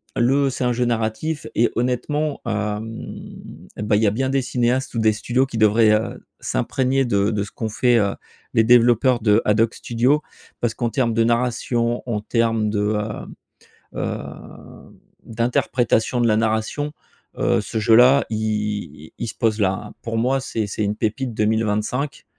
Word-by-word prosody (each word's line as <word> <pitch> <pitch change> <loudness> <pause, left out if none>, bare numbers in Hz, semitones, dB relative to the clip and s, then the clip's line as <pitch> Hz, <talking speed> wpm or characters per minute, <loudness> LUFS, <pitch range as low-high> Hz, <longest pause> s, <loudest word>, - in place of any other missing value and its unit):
le 135 +3 +2
c'est 130 - -3
un 125 -1 +1
jeu 125 +1 0
narratif 120 +7 -2
et 120 - +3
honnêtement, 140 +5 -1
hem, 105 0 -4 0.4
bah, 105 0 0
il 110 - +1
y - - +4
a 100 - +3
bien 130 +4 -1
des 135 0 +1
cinéastes 125 +1 0
ou 115 - 0
des 110 -1 +4
studios 125 +4 0
qui 125 -3 -6
devraient, 110 0 +4
heu, 110 +2 -2
s'imprégner 130 - 0
de 100 -2 +1
de 105 -2 -1
ce 105 - -9
qu'ont 110 - -4
fait, 120 +2 +2
heu, 100 -1 0 0.4
les 115 - +4
développeurs 120 +1 +4
de 105 0 +4
AdHoc 110 +2 +2
Studio. 125 +6 +1 0.4
Parce 115 -2 0
qu'en 120 - -1
terme 115 -2 0
de 115 0 +2
narration, 120 0 0
en 105 -2 -1
terme 115 -1 0
de, 105 0 -1 0.2
heu, 105 0 -4 0.7
heu, - - -2 1.1
d'interprétation 120 +1 0
de 120 - +3
la 110 - +3
narration, 110 +7 -1 0.5
heu, - - +2
ce - - -4
jeu-là, 125 +6 +5
i 105 -8 -3
il - - -3
se - - -6
pose 110 -3 0
là, 95 -1 +3
hein. 105 +2 -8
Pour 115 -1 -3
moi, 130 +4 +1
c'est 115 -5 -3
c'est 105 +2 -3
une 105 +1 -1
pépite 115 +2 -2
2025, 110 +6 -1
115 Hz, 170 wpm, -21 LUFS, 110-125 Hz, 1.1 s, jeu-là